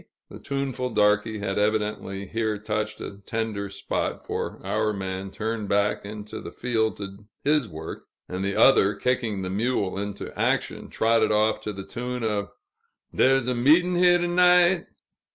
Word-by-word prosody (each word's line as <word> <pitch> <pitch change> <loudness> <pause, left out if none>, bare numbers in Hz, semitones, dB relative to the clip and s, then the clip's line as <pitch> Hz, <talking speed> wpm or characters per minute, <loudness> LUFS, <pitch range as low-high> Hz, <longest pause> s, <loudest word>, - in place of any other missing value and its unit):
The - - -9
tuneful 135 -2 -3
darky 105 0 +2
had 100 -1 -2
evidently 105 -2 -1
here 110 +1 -1
touched 105 0 -3
a 100 - -7
tender 110 -2 -3
spot, - - -3
for - - -4
our 105 +2 0
man 95 -1 -4
turned 110 0 -3
back 100 +1 +1
into 105 0 -7
the - - -8
field 110 -3 -1
to 100 0 -8 0.2
his 150 -3 +2
work; 80 -1 -8 0.2
and 90 +1 -4
the 100 0 -1
other, 105 -6 +5
kicking 115 -6 -1
the 95 - -3
mule 100 -2 0
into 100 0 -5
action, - - -1
trotted 115 -1 +2
off 110 +1 +2
to 105 - -4
the 95 -1 -7
tune 125 0 -4
of 105 -2 -1 0.6
"Dar's 135 -1 +3
a 125 - +2
meet'n' 160 +9 +4
here, 175 0 +5
to 175 0 -1
night!" 180 0 +4
110 Hz, 160 wpm, -25 LUFS, 100-125 Hz, 0.6 s, other